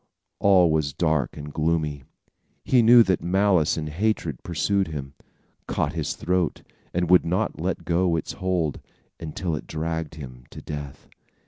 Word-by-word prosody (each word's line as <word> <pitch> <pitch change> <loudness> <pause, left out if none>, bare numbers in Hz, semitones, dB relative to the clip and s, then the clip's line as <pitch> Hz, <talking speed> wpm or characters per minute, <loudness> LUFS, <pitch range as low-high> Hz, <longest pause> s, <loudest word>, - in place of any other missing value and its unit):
All 95 -4 +5
was 75 -2 0
dark 80 -5 0
and 75 0 -8
gloomy. 75 -3 -1 0.6
He 125 -2 +4
knew 120 +1 +8
that 95 -5 0
malice 90 -3 +2
and 75 -1 -3
hatred 85 - -1
pursued 95 +4 0
him, 70 -3 -6 0.5
caught - - -1
his - - -2
throat 90 0 -1 0.3
and 90 0 0
would 90 +1 +6
not 90 0 -1
let 90 0 -2
go 85 0 +2
its 80 - -3
hold, 90 -5 -2 0.4
until 80 +1 -3
it 70 - -7
dragged 80 0 -3
him 65 -5 -10
to - - -10
death. 75 -3 -8
80 Hz, 150 wpm, -24 LUFS, 75-90 Hz, 0.6 s, knew